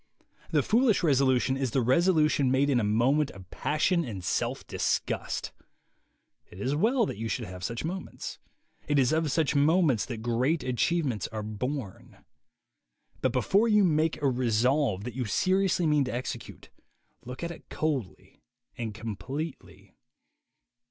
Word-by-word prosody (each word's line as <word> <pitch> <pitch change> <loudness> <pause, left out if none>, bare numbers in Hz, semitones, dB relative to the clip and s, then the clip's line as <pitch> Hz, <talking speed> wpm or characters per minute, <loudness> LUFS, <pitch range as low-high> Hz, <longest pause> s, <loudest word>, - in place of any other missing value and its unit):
The - - +2
foolish 225 -3 +3
resolution 130 -3 +3
is 135 -1 -1
the 130 - +1
resolution 150 0 +3
made 135 +2 +2
in 125 - +3
a - - 0
moment 125 +8 +2
of 95 -2 -12
passion 170 +3 +1
and 100 - -6
self - - -1
disgust. - - -2 1.0
It 90 - -13
is 130 +7 -1
well 230 - +2
that - - -5
you 115 - -3
should 115 +1 -2
have 90 -1 -9
such 115 +8 -3
moments. 185 +3 -6 0.5
It 145 - +2
is 130 -3 +3
of 160 -2 +1
such 155 -2 +1
moments 145 - +3
that 115 -4 -6
great 125 +7 +1
achievements 130 - 0
are 110 -1 -5
born. 110 0 -5 1.0
But - - +2
before 210 +4 +2
you 210 -2 +4
make 160 -2 +2
a - - +4
resolve 125 -2 +1
that 125 +1 -5
you 125 0 -3
seriously 185 - +1
mean 150 -3 +3
to 125 - -4
execute, 125 - -6 0.5
look 125 +5 -8
at 170 - -3
it 170 - -12
coldly 140 -11 -4 0.3
and 110 -3 -5
completely. 130 - -6
135 Hz, 150 wpm, -28 LUFS, 115-160 Hz, 1.0 s, you